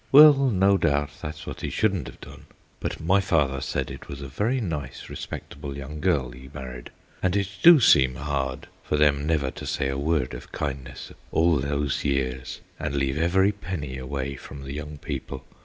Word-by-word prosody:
Well, 150 +2 +10 0.2
no 100 -2 +4
doubt, 75 -2 +1
that's 75 0 -6
what - - -7
he - - -2
shouldn't 95 -9 0
have - - -11
done, - - -12 0.3
but - - -3
my 95 +5 +3
father 75 -8 +1
said - - -2
it - - -9
was 70 -1 -7
a - - -5
very 110 - 0
nice 75 - -5
respectable 70 -1 -7
young 70 +2 -7
girl 75 -7 +1
he 65 +2 -12
married, 65 -3 -8 0.3
and 95 0 +1
it 100 -1 +1
do 170 -2 +9
seem 65 - +5
hard 70 -2 -3
for 75 - -1
them 75 -1 +3
never 75 -5 +1
to - - -8
say 65 - -1
a 70 0 -2
word 75 -3 0
of - - -9
kindness 70 -2 -5 0.2
all 80 -2 +3
those 70 +1 -1
years 65 -2 -2 0.2
and 70 - -2
leave 70 +1 0
every 95 +4 +3
penny 85 -10 -5
away 70 +1 -4
from 70 +1 -10
the 70 0 -6
young 75 +1 -6
people. 65 -1 -6
70 Hz, 190 wpm, -25 LUFS, 65-85 Hz, 0.3 s, Well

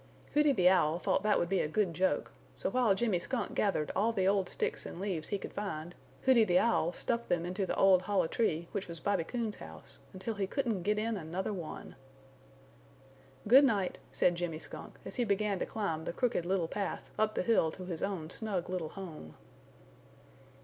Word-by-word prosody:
Hooty 300 0 +5
the 185 -9 +4
Owl 170 -4 +4
thought 180 - +1
that 210 +1 +3
would 175 - +1
be 195 +1 +1
a - - +1
good 185 +2 0
joke 180 -3 0 0.2
so - - -2
while 240 -5 +3
Jimmy 200 -4 +1
Skunk 250 +7 -3
gathered 190 -7 0
all 220 +4 +2
the 190 -4 +1
old 195 -2 +2
sticks - - -2
and - - -8
leaves 185 -5 -2
he 200 - -1
could - - -8
find, 175 -5 -4 0.3
Hooty 255 -4 +6
the 180 -4 +3
Owl 180 -6 +3
stuffed 235 +6 -2
them 175 -1 +1
into 185 +2 -2
the - - -1
old 190 -2 +5
hollow 200 -1 +1
tree 170 -3 0
which 200 - -3
was 170 -1 -7
Bobby 200 -2 +1
Coon's 225 +2 -3
house, 80 -1 -12
until 190 +4 -4
he 200 -2 -2
couldn't 230 -5 -1
get 210 +4 +1
in 220 0 -1
another 185 +4 -3
one. 170 -5 -7 1.5
"Good 260 +6 +8
night," 205 -9 +1
said 175 - +3
Jimmy 170 -2 -3
Skunk - - -9
as - - -6
he 245 - +2
began 205 -2 0
to - - -2
climb 165 -7 -2
the - - -3
Crooked 230 -6 0
Little 185 -3 +1
Path 200 +3 -4
up 215 0 +2
the - - 0
hill 185 -7 +3
to 185 - -8
his 170 -3 -5
own 180 -5 -3
snug 190 -5 -3
little 175 -4 -2
home. 160 - -9
190 Hz, 200 wpm, -32 LUFS, 170-215 Hz, 1.5 s, Good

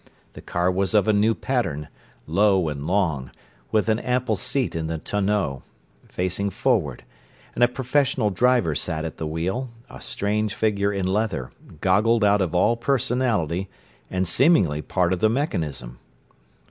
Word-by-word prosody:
The - - -10
car 90 +1 0
was 95 +2 0
of 105 -1 +4
a 110 - +4
new 110 +2 +3
pattern, 85 - -2 0.4
low 95 0 +2
and 75 0 -5
long, 80 -9 0 0.4
with 110 0 +2
an 110 0 +2
ample 125 -3 0
seat 130 +5 -2
in 80 -1 -2
the 80 0 -3
tonneau, 100 -6 -1 0.5
facing 95 +2 -2
forward; 95 - 0 0.5
and 120 - +1
a - - +7
professional 130 -3 0
driver 120 -4 +2
sat 80 +1 -3
at 80 - -6
the 80 - -3
wheel, 90 +11 -2 0.2
a - - -11
strange 105 0 -2
figure 100 -2 +1
in 100 -2 -2
leather, 95 - -1 0.3
goggled 110 +4 +3
out 105 0 +4
of 90 -2 -1
all 105 +6 +3
personality 115 - 0 0.4
and 95 0 -1
seemingly 90 - +3
part 90 +2 0
of 90 - -2
the 110 - +3
mechanism. 80 - -3
100 Hz, 155 wpm, -23 LUFS, 85-115 Hz, 0.5 s, a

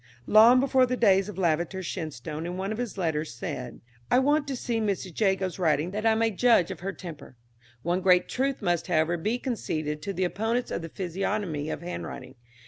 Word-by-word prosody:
"Long 225 - +7
before 260 -1 +3
the 250 0 -1
days 195 -3 +4
of 200 - -8
Lavater, 175 +1 0
Shenstone 155 -2 -5
in 180 +1 -5
one 195 +2 -3
of 220 - -4
his 240 -4 -4
letters 155 -7 -2
said, 125 +1 -6 0.3
'I - - +4
want 290 +3 +2
to 275 - -2
see 235 -2 -2
Mrs. 195 -4 -2
Jago's 190 -3 +1
writing 160 0 +1
that 215 +3 -1
I 220 - +4
may 225 0 +2
judge 220 -4 +3
of - - -7
her 195 +2 -3
temper.' 155 -9 -10 0.5
"One 175 +2 0
great 180 -1 +4
truth 270 -2 -1
must, 175 -3 0
however, 165 -1 +2
be 215 +8 -1
conceded 155 - -3
to 200 - -3
the 185 -1 -1
opponents 225 +7 -1
of - - -2
the 165 - -7
physiognomy 180 -3 -3
of - - -5
handwriting. 135 -6 -6
190 Hz, 200 wpm, -27 LUFS, 165-225 Hz, 0.5 s, Long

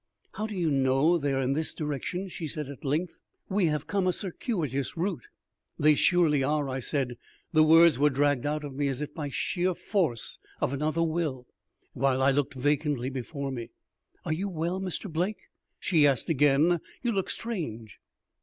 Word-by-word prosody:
"How 215 - -3
do 215 - -6
you 170 -4 +1
know 135 +5 +3
they 145 -2 0
are 135 0 +1
in 130 +2 +1
this 155 +2 -2
direction?" 155 +5 -3
she 170 -3 -5
said 150 -2 -4
at 140 - -10
length. 155 +6 -1 0.3
"We 190 -2 +2
have 150 -1 -1
come 195 -2 0
a - - +4
circuitous 165 - -3
route." 195 - -2 0.5
"They 155 -1 +5
surely 155 -2 +3
are," 145 +1 +1
I 130 0 -3
said. 125 -1 -2 0.4
The 155 - +6
words 160 -2 +6
were 150 +1 +5
dragged 145 -1 +1
out 150 +1 -1
of 145 -2 -6
me, 140 +1 0
as 135 +1 -2
if 150 0 -7
by 145 -2 -4
sheer 180 +5 -1
force 160 - -1 0.2
of 130 - 0
another 155 +4 0
will, 155 -6 -1 0.5
while 130 0 +1
I 135 +1 +4
looked 140 0 0
vacantly 145 -1 0
before 135 +2 -4
me. 120 -3 -5 0.6
"Are 155 - 0
you 195 +5 -2
well, 175 +2 -2
Mr. 190 +2 -4
Blake?" 180 +5 -1 0.4
she 160 -6 +4
asked 135 +1 0
again. 150 +3 +4 0.2
"You 240 - +1
look 195 -4 -1
strange." 120 - -5
150 Hz, 180 wpm, -28 LUFS, 135-175 Hz, 0.6 s, The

